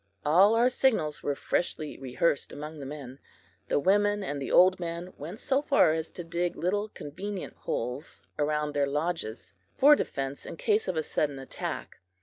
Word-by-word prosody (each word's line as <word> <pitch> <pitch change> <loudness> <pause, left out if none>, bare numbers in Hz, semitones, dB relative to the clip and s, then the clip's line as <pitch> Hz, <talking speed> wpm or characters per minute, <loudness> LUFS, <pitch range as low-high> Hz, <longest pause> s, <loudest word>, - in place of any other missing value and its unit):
All 190 +9 +6
our 240 +2 +4
signals 215 - +1
were 145 - -1
freshly 155 0 -2
rehearsed 135 +4 0
among 150 +1 -7
the 135 - -6
men. 135 -2 -8 0.5
The - - +1
women 205 +4 +3
and 145 -6 -3
old 185 +1 +6
men 170 +1 -5
went 170 +9 -8
so 270 +1 +1
far 275 - +4
as 160 0 -2
to 175 - -7
dig 170 +1 -2
little 205 +4 -1
convenient 190 +5 -6
holes 125 +5 -4 0.2
around 150 0 0
their 145 -1 +2
lodges, 145 - -3 0.2
for 295 +2 +8
defense 135 - -3
in - - -8
case 215 +2 +1
of 185 -3 -1
a 155 - +1
sudden 145 -2 -1
attack. 135 0 -6
165 Hz, 165 wpm, -28 LUFS, 145-195 Hz, 0.5 s, for